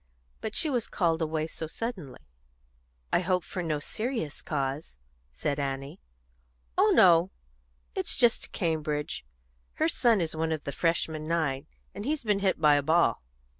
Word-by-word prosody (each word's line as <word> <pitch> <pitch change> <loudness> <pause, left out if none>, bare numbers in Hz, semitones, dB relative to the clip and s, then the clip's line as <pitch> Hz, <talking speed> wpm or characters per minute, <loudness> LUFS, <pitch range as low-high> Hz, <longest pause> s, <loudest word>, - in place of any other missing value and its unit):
But 215 - -5
she 325 - +3
was 245 -6 0
called 165 -3 +1
away 155 -1 0
so 160 0 -6
suddenly." 185 - -5 0.9
"I - - +5
hope 180 0 +1
for 185 - -5
no 160 -3 -1
serious 215 - -3
cause," 140 - -3 0.3
said 140 - -2
Annie. 135 0 -4 0.8
"Oh - - +5
no! 175 0 +6 0.6
It's - - 0
just 240 -2 +4
to - - -15
Cambridge. 155 -4 -2 0.5
Her 315 - +1
son 235 -9 +3
is 160 -2 -1
one 160 0 -1
of 155 -2 -2
the 140 - -4
Freshman 160 0 0
Nine, 155 -4 0 0.3
and 205 - -6
he's 295 +3 -1
been 210 -3 +2
hit 195 -4 +1
by 150 -2 +6
a - - +2
ball." 160 -4 +3
160 Hz, 160 wpm, -28 LUFS, 150-195 Hz, 0.9 s, no